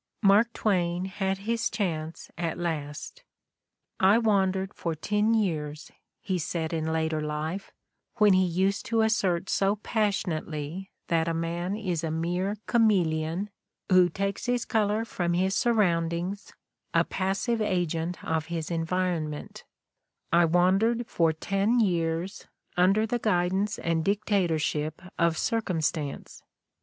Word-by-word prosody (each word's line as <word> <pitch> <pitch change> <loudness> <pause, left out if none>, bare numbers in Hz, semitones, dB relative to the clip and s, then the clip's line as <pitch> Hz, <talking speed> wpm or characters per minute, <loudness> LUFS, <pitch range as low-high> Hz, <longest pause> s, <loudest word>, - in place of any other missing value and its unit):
Mark 210 +4 +5
Twain 180 -3 0
had 190 0 -2
his 230 +1 0
chance 165 -6 -3
at 170 -2 -2
last! 160 - -4 0.8
"I 195 +3 +6
wandered 195 -3 +1
for 165 -2 -3
ten 210 +7 +1
years'," 155 -8 -2 0.3
he 190 -3 -1
said 165 -1 -3
in 160 -1 -1
later 160 -1 0
life, 155 +5 -4 0.4
when 210 -3 +5
he 185 0 +4
used 190 +3 0
to 225 -1 +2
assert 195 -5 +1
so 195 +1 +2
passionately 185 -5 -2 0.2
that 165 0 +2
man 170 +3 -2
is 180 -6 -2
a 165 - -1
mere 175 +5 -1
chameleon, 185 -4 +1 0.4
who 180 -1 +6
takes 195 +4 -3
his 245 -1 0
color 215 0 +1
from 175 -6 -1
his 190 +2 +1
surroundings, 180 -4 0 0.4
a - - +5
passive 195 +5 -1
agent 175 -3 -1
of 160 0 -1
his 165 -1 -4
environment, 165 -2 -2 0.7
"I 170 0 +6
wandered 190 +8 +3
for 165 -6 +2
ten 195 +8 +1
years, 170 -2 -1 0.3
under 195 +5 +4
the 240 +2 -1
guidance 195 0 +1
and 165 -1 0
dictatorship 160 -6 0 0.2
of 170 -2 +2
Circumstance. 165 - -2
180 Hz, 125 wpm, -27 LUFS, 165-205 Hz, 0.8 s, I